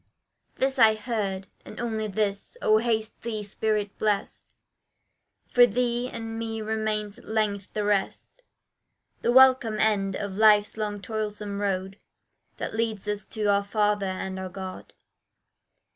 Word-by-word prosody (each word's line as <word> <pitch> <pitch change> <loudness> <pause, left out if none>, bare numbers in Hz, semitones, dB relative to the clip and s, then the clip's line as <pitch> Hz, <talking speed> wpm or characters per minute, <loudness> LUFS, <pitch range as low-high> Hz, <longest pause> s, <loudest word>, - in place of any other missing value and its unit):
This 265 0 0
I 220 -2 +7
heard, 210 -4 -3 0.2
And 215 - -10
only 220 -2 -2
this, 200 0 -2
"Oh! 215 0 +4
haste 220 -1 -1
thee, 220 -2 -3
spirit 210 0 -1
blest, 210 -2 -1 1.0
For 245 -1 +7
thee 245 +2 0
and 225 0 -5
me 225 -1 -3
remains 215 -1 -2
at - - -17
length 210 -3 -1
the 210 - -1
rest, 205 - -1 0.8
The 235 - +2
welcome 255 -4 +6
end 200 -3 +1
of 200 -1 -4
life's 210 0 +5
long 210 -2 -3
toilsome 210 -2 -3
road, 195 -1 -2 0.6
That - - -4
leads 220 -2 -2
us 210 0 -3
to 215 -2 -4
our 200 0 +3
Father 205 -1 +1
and 190 0 -4
our 190 0 -5
God." 185 0 -8
215 Hz, 140 wpm, -26 LUFS, 200-220 Hz, 1.0 s, I